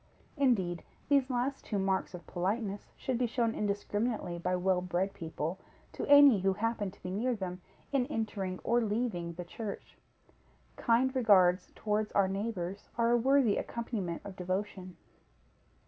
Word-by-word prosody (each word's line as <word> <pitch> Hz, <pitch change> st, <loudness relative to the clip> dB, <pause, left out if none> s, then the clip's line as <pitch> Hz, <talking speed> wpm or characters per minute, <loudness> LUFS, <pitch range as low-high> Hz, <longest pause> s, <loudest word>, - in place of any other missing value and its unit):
Indeed, 200 Hz, -, +1 dB, 0.3 s
these 280 Hz, -3 st, +4 dB
two 260 Hz, -, -4 dB
last 260 Hz, +2 st, -2 dB
marks 190 Hz, -2 st, 0 dB
of 175 Hz, -, -10 dB
politeness 200 Hz, +3 st, -2 dB
should 255 Hz, -3 st, -2 dB
be 245 Hz, -, +2 dB
shown 230 Hz, -1 st, 0 dB
indiscriminately 205 Hz, -2 st, -2 dB
by 180 Hz, +2 st, 0 dB
well 180 Hz, 0 st, +1 dB
bred 180 Hz, +2 st, -1 dB
people 165 Hz, +2 st, -4 dB, 0.3 s
to -, -, -4 dB
any 285 Hz, -6 st, +8 dB
who 190 Hz, +1 st, +2 dB
happen 210 Hz, 0 st, -1 dB
to 190 Hz, -, -18 dB
be 180 Hz, -, -4 dB
near 235 Hz, +6 st, 0 dB
them, 185 Hz, -3 st, -5 dB, 0.3 s
in 265 Hz, -3 st, +1 dB
entering 210 Hz, -8 st, -3 dB
or 240 Hz, +1 st, +2 dB
leaving 210 Hz, -6 st, -1 dB
the 175 Hz, +1 st, -7 dB
church. 205 Hz, +3 st, -7 dB, 0.8 s
Kind 255 Hz, +3 st, +2 dB
regards 190 Hz, -7 st, +4 dB
towards 210 Hz, 0 st, -1 dB
our 200 Hz, -1 st, +4 dB
neighbors 195 Hz, -1 st, -4 dB
are 235 Hz, 0 st, +3 dB
a -, -, +5 dB
worthy 255 Hz, -2 st, +3 dB
accompaniment 210 Hz, -8 st, -3 dB
of 200 Hz, -2 st, -7 dB
devotion. 185 Hz, 0 st, -4 dB
205 Hz, 150 wpm, -31 LUFS, 185-235 Hz, 0.8 s, any